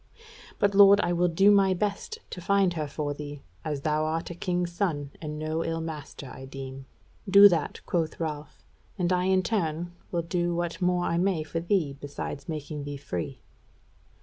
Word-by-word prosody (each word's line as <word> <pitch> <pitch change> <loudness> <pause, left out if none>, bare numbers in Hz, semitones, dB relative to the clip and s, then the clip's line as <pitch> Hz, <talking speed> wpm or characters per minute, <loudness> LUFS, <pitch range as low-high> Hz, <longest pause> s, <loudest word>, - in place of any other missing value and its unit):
But, 200 -1 +2
lord, 200 0 +8
I 175 - 0
will 175 +1 +3
do 195 +5 +5
my 195 -2 +4
best 205 - -2
to 180 - -6
find 195 0 +3
her 155 -3 -2
for 145 0 -3
thee; 145 -1 -8 0.2
as 150 -3 -3
thou 155 +1 +1
art 160 +2 -2
a - - -4
king's 175 0 -1
son 160 -6 -1
and 150 -1 -5
no 155 +1 -2
ill 165 0 -2
master, 155 -3 -6
I 130 - -9
deem." 135 0 -8 0.4
"Do 200 +1 +10
that," 165 -5 -1
quoth 165 -3 -1
Ralph, 150 -2 -5 0.3
"and 180 -1 +1
I 180 0 +1
in 190 0 +3
turn 175 -5 -1 0.2
will 170 -1 0
do 175 +1 -1
what 175 +1 -3
more 180 0 +2
I 170 - +1
may 180 -4 +1
for 160 +2 -3
thee 170 -5 0
besides 145 0 -6
making 150 -1 -4
thee 145 0 -5
free." 90 - -5
165 Hz, 185 wpm, -27 LUFS, 150-180 Hz, 0.4 s, Do